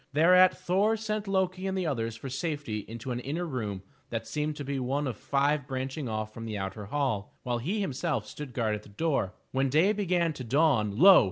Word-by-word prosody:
Thereat 180 +4 +6
Thor 205 +5 +2
sent 215 -1 -3
Loki 190 -1 0
and 190 0 -1
the 185 - 0
others 115 -7 -1
for 115 - -7
safety 140 -4 -3
into 115 +3 -6
an 120 - -2
inner 150 +8 -3
room 105 - -4 0.3
that 115 -1 -3
seemed 150 +2 -2
to 145 - -5
be 140 0 -2
one 135 +3 -1
of 130 -4 -2
five 140 +4 +1
branching 130 0 -3
off 110 0 -3
from 115 0 -7
the 110 -2 -3
outer 95 +2 -4
hall, 125 -6 -1
while 120 -1 -1
he 190 - -1
himself 135 - -1
stood 135 +5 -8
guard 115 -3 0
at 105 - -3
the 105 - -16
door. 110 - -1 0.2
When 135 +1 +1
day 165 +10 +4
began 180 -5 +1
to 135 - -7
dawn, 120 -6 +2
lo! 190 +4 +9
140 Hz, 210 wpm, -29 LUFS, 115-170 Hz, 0.3 s, lo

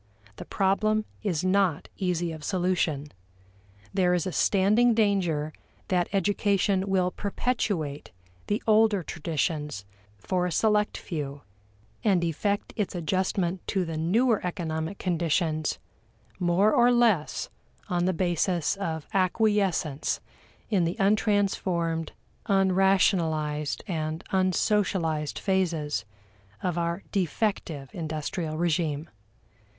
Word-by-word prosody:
The - - -7
problem 215 +3 +1 0.2
is 180 -6 -1
not 185 -4 +2
easy 175 -2 -1
of 155 -2 -8
solution. 175 -5 0 0.8
There 180 -2 +3
is 175 - -1
a 185 - -2
standing 210 +8 +3
danger 175 -8 +1 0.4
that 180 -2 +2
education 200 0 +1
will 185 -1 +2
perpetuate 200 - -2 0.4
the 210 +2 -1
older 215 -3 +4
traditions 150 - -2 0.3
for 180 - -1
a - - -3
select 210 +4 +2
few, 145 -4 -5 0.6
and 190 -5 +3
effect 200 +5 -1
its 205 -3 -2
adjustment 180 +1 -1
to 190 -2 0
the 165 -1 -4
newer 215 +9 +2
economic 170 -1 -3
conditions 165 -3 0 0.6
more 185 +4 +3
or 240 +1 +5
less 230 -10 +2 0.4
on 175 -3 0
the 185 - +3
basis 175 -1 0
of 160 -6 -3
acquiescence 190 -6 +1 0.5
in 195 -5 +3
the 170 +1 -1
untransformed, 195 -5 +1 0.4
unrationalized, 185 -6 +2
and 160 -2 -3
unsocialized 185 -5 +1
phases 165 - 0 0.6
of 180 -3 0
our 170 +2 -2
defective 175 - -1
industrial 155 0 -3
regime. 160 -2 0
180 Hz, 105 wpm, -27 LUFS, 160-200 Hz, 0.8 s, or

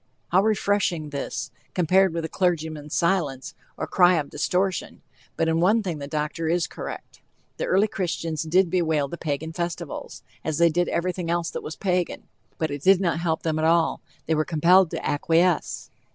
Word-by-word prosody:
How 185 +2 +4
refreshing 200 -7 0
this, 140 0 -4 0.2
compared 185 +2 +4
with 165 0 -3
the - - -2
clergyman's 160 -5 -1
silence, 165 -7 0 0.2
or - - -2
cry 180 -1 +4
of 150 -3 -2
"distortion." 185 +5 -1 0.3
But 165 - 0
in 165 0 +2
one 210 +6 +3
thing 170 -6 -3
the 140 - -6
doctor 150 +2 -2
is 170 0 +1
correct. - - -8 0.4
The - - -2
early 195 +3 +3
Christians 165 -5 -3
did 175 +2 +2
bewail 160 -5 +1
the 170 - -7
Pagan 160 +1 -3
festivals, 170 -1 -5 0.2
as 155 -1 -2
they 170 0 +5
did 175 +2 0
everything 180 0 -2
else 170 -1 0
that - - -5
was 155 - -7
Pagan. 180 -3 -1 0.3
But 160 -2 -1
it 145 -1 -4
did 190 +3 +5
not 170 -4 0
help 165 -2 -1
them 155 -1 0
at 155 - +1
all; 165 0 +2 0.2
they 160 - +1
were 155 0 +2
compelled 175 +3 +4
to - - -4
acquiesce. 165 +4 +1
170 Hz, 180 wpm, -24 LUFS, 155-180 Hz, 0.4 s, they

